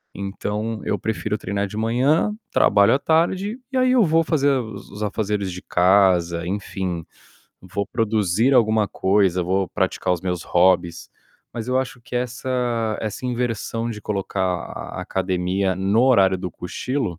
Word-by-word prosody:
Então 105 +3 -4
eu 105 - -1
prefiro 105 -1 -2
treinar 100 0 -2
de 105 - -8
manhã, 130 - +2 0.2
trabalho 100 +3 +4
à 135 - +2
tarde, 185 +8 +1
e 260 - -1
aí 255 0 +3
eu 240 -4 +5
vou 165 +1 +3
fazer 145 -3 +2
os 110 -7 -3
os 105 - -9
afazeres 105 -2 -1
de 90 +1 -7
casa, 90 -2 +3
enfim, 95 -4 -3 0.6
vou 95 +2 -4
produzir 110 +3 +1
alguma 110 -3 +3
coisa, 95 -2 +2
vou 95 +1 0
praticar 90 - -1
os 85 - -6
meus 90 -2 -2
hobbies. 90 -1 +2 0.4
Mas 115 -1 -5
eu 130 +1 +2
acho 130 -1 -4
que 125 +1 -5
essa 120 -3 -1
essa 110 +3 -5
inversão 120 -1 -2
de 105 -2 -6
colocar 100 -2 -2
a 90 -1 -4
a - - -3
academia 95 0 -1
no 100 +5 +2
horário 100 -8 +4
do 90 -1 -4
cochilo, 125 - -3
105 Hz, 155 wpm, -22 LUFS, 95-125 Hz, 0.6 s, eu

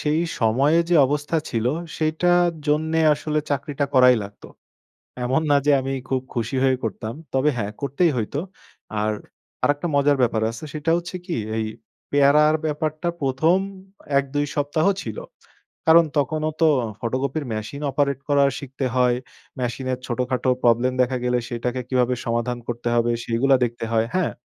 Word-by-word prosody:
সেই 150 +2 +1 0.2
সময়ে 135 +8 +3
যে - - +4
অবস্থা 145 +3 -1
ছিল 115 0 -1 0.3
সেইটার 175 +3 +2 0.2
জন্যে 160 +2 +1
আসলে 155 +1 -2
চাকরিটা 145 0 -1
করাই 125 -1 +7
লাগত। 100 0 -11 0.8
এমন 130 +5 +1
না 145 - +6
যে 150 - +5
আমি 135 +1 -3 0.2
খুব 130 -1 0
খুশি 120 +1 -2
হয়ে 130 -1 +3
করতাম। 110 +1 -4 0.2
তবে 135 +3 +3
হ্যাঁ 105 -2 -2
করতেই 140 +5 +2
হইতো। 115 +6 -2 0.6
আর 110 - +1 0.5
আরেকটা 145 +4 +1
মজার 140 0 +3
ব্যাপার 115 -3 +2
আছে 115 - -10
সেটা 155 +2 -1
হচ্ছে 175 +1 -6
কি 180 - -3 0.2
এই 110 - 0 0.5
পেয়ারার 145 +2 +5
ব্যাপারটা 155 +2 -2
১ম 140 +6 +2 0.6
১ 140 - +3
২ 145 0 +2
সপ্তাহ 145 +2 0 0.2
ছিল। 110 -2 -5 0.7
কারণ 165 +1 +7
তখনও 155 +3 -1
তো 165 - +6 0.3
ফটোকপির 130 +5 -2
মেশিন 110 +7 -5
অপারেট 140 -1 0
করা 140 -1 +4 0.2
শিখতে 135 0 -5
হয়। 125 -1 +3 0.4
মেশিনের 125 +1 -2
ছোটখাটো 125 +1 -1
প্রবলেম 120 +2 +3
দেখা 125 +1 +1
গেলে 125 0 +2
সেটাকে 125 +1 -2
কিভাবে 125 -1 +2
সমাধান 120 +1 -1
করতে 120 0 -4
হবে 120 0 +2
সেইগুলা 130 +4 +2
দেখতে 120 0 -5
হয়। 115 0 +2
হ্যাঁ? 185 -3 +1
135 Hz, 150 wpm, -23 LUFS, 120-150 Hz, 0.8 s, করাই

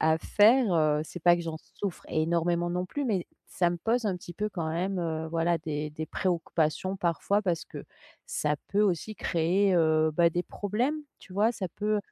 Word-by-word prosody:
à 160 0 +3
faire, 220 +4 +4
heu. 155 -2 +3
C'est 175 +3 -9
pas 175 0 +6
que 170 - -4
j'en 165 -1 -4 0.2
souffre 195 -4 -4
énormément 170 +2 +1
non 180 +1 -1
plus 285 +9 -3
mais, 195 -6 0 0.2
ça 175 -2 +2
me 175 - -3
pose 230 +5 0
un 195 - +1
petit 175 -1 -10
peu, 210 +1 -1
quand 170 -5 -3
même, 180 +4 -1
heu, 160 -1 -2
voilà, 165 +1 +1
des 150 -1 -3
des 155 +1 -5
préoccupations 175 +1 -1
parfois 185 +3 +1
parce 175 -5 -1
que - - -9 0.4
ça 150 -1 -1
peut 205 +1 +2
aussi 205 +2 0
créer, 180 +4 +2
heu, 160 -2 +3
bah, 170 +2 +4
des 175 +2 -1
problèmes, 235 +9 -1 0.2
tu 185 - -15
vois? 210 +4 +3
Ça 200 -5 -4
peut, 210 0 +1
175 Hz, 200 wpm, -28 LUFS, 160-200 Hz, 0.4 s, pas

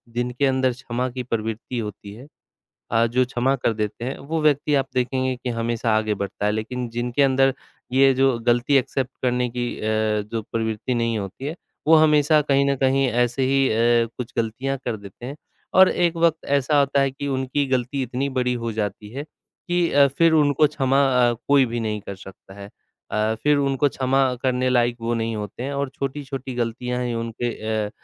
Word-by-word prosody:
जिनके 125 +3 0
अंदर 130 -1 +2
क्षमा 125 0 -3
की 125 0 -5
प्रवृत्ति 115 +1 -4
होती 105 -2 -7
है 125 +6 -12 0.6
अ, 115 +1 +3
जो 125 +2 +1
क्षमा 125 +2 0
कर 120 -3 0
देते 110 +2 -4
हैं, 130 - -4
वो 160 +3 -3
व्यक्ति 150 -1 +2
आप 135 -1 +1
देखेंगे 130 0 0
कि 125 0 -5
हमेशा 115 -1 0
आगे 110 -1 0
बढ़ता 100 +1 -4
है, 105 - +2
लेकिन 120 +3 -3
जिनके 120 +3 -1
अंदर 135 0 +3 0.4
ये 135 +1 +5
जो 135 -1 +2
गलती 120 +4 +3
एक्सेप्ट 135 0 -1
करने 125 -1 0
की 120 0 -3
अ, - - -8 0.5
जो 115 - -2
प्रवृत्ति 110 +2 -2
नहीं 115 -1 0
होती 100 +7 -7
है, 155 +3 -3 0.3
वो 160 - +7
हमेशा 150 -1 +5
कहीं 140 -1 +2
न - - 0
कहीं 135 +1 +2
ऐसे 120 +2 +1
ही 135 0 +3
अ, 115 +1 +3
कुछ 125 0 -6
गलतियाँ 125 +5 -1
कर 115 -3 -2
देते 100 +3 -11
हैं। 135 +3 -6 0.4
और 190 0 +7
एक 175 -1 +1
वक़्त 165 -1 +1
ऐसा 140 +1 +2
होता 140 0 +2
है 135 -1 +1
कि 140 +2 -6
उनकी 130 +1 -1
गलती 130 +1 -1
इतनी 130 +3 -2
बड़ी 125 0 +1
हो 115 - -1
जाती 105 -1 -4
है 140 +2 -4
कि 175 +3 -3
अ, 140 0 +6
फिर 165 +5 +3
उनको 150 -1 +4
क्षमा 135 -2 +1 0.3
अ, - - 0
कोई 140 -2 +5
भी 120 0 -3
नहीं 110 -2 -2
कर 100 - -7
सकता 95 0 -14
है। 100 0 -9 0.4
अ, 110 +1 0
फिर 150 0 +4
उनको 140 0 +2
क्षमा 135 0 +1 0.2
करने 130 -1 +1
लायक 120 -1 +2
वो 115 +1 -1
नहीं 115 -1 -2
होते 105 +3 -6
हैं 140 +2 -3
और 140 -1 -2
छोटी-छोटी 135 -1 -5
गलतियाँ 125 +1 -2
ही 120 -1 -2
उनके 115 +1 -3 0.4
अ - - -8
125 Hz, 195 wpm, -23 LUFS, 115-140 Hz, 0.6 s, वो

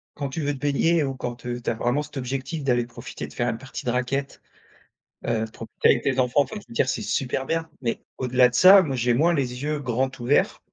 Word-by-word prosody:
quand 140 -2 -3
tu 155 +4 -4
veux 145 0 0
te 135 - -8
baigner 150 +3 +2
ou 135 -1 -2
quand, 120 -1 -6
heu, 120 0 -3
tu - - -2
as - - +1
vraiment 120 +6 0
cet 145 - -10
objectif 135 +4 -4
d'aller 120 -3 +2
profiter 120 +1 -8
de - - -14
faire 120 -1 0
une 115 - -2
partie 130 +2 -8
de 120 - +1
raquette, 135 +3 -2 0.9
heu, 110 -1 0
profiter 115 0 -1
avec 120 - +3
tes 135 -1 0
enfants, 125 +3 +3
enfin 140 +10 -4
je - - -17
veux 235 - -12
dire - - +1
c'est - - -1
super 135 - -1
bien, 165 +1 -2
mais 115 -2 -2
au-delà 125 -1 +3
de - - -16
ça, 190 +4 +9
moi, 140 -6 -2
j'ai 120 0 +2
moins 165 +7 +3
les 130 -2 -2
yeux 150 0 -1
grands 130 0 -1
ouverts 125 +4 +2
130 Hz, 245 wpm, -24 LUFS, 120-145 Hz, 0.9 s, ça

